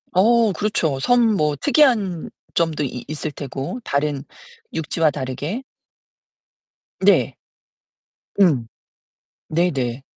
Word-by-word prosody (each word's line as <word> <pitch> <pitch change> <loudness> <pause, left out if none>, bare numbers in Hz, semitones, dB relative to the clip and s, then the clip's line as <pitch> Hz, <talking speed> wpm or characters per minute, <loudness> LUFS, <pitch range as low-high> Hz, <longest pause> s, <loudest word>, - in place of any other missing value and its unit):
어, 225 +4 +4
그렇죠. 165 -7 0
섬 245 - +3 0.2
뭐 150 -2 +1
특이한 220 - +2 0.2
점도 165 -3 +1
이 125 -3 -5
있을 155 +1 -4
테고, 140 - -5
다른 140 -1 -1 0.5
육지와 160 0 +1
다르게. 145 - -4 1.4
네. - - +3 1.0
음. 145 - +4 0.8
네네. 140 -7 0
155 Hz, 165 characters per minute, -21 LUFS, 140-195 Hz, 1.4 s, 어